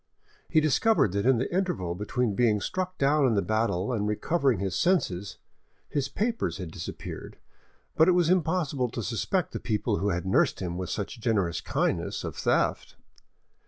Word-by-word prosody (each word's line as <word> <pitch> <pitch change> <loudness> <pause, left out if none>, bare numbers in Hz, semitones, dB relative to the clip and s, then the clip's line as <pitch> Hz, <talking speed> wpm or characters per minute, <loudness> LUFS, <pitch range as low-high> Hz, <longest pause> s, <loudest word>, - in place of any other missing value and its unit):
He 160 - +4
discovered 155 - +3
that 100 +4 0
in 130 -2 +5
the 130 +8 -2
interval 180 - -1
between 105 +4 -1
being 110 -1 +2
struck 185 - -3
down 140 0 +3
in 115 - +2
the 100 - +3
battle 110 -1 0
and 105 -3 -1
recovering 135 - +1
his 95 0 -2
senses, 100 - 0 0.5
his 135 -2 -1
papers 230 - -1
had 90 -4 -6
disappeared, - - -7 0.6
but 160 - +5
it 185 - +5
was 175 -2 +3
impossible 160 -7 +1
to 115 0 -5
suspect 160 - -1
the - - -4
people 105 -3 -1
who 100 +3 0
had 90 -1 -2
nursed 95 - +2
him 90 -2 -3
with 90 -1 -4
such 105 +4 -4
generous 95 -8 0
kindness - - -1
of - - -5
theft. - - 0
120 Hz, 170 wpm, -27 LUFS, 100-160 Hz, 0.6 s, in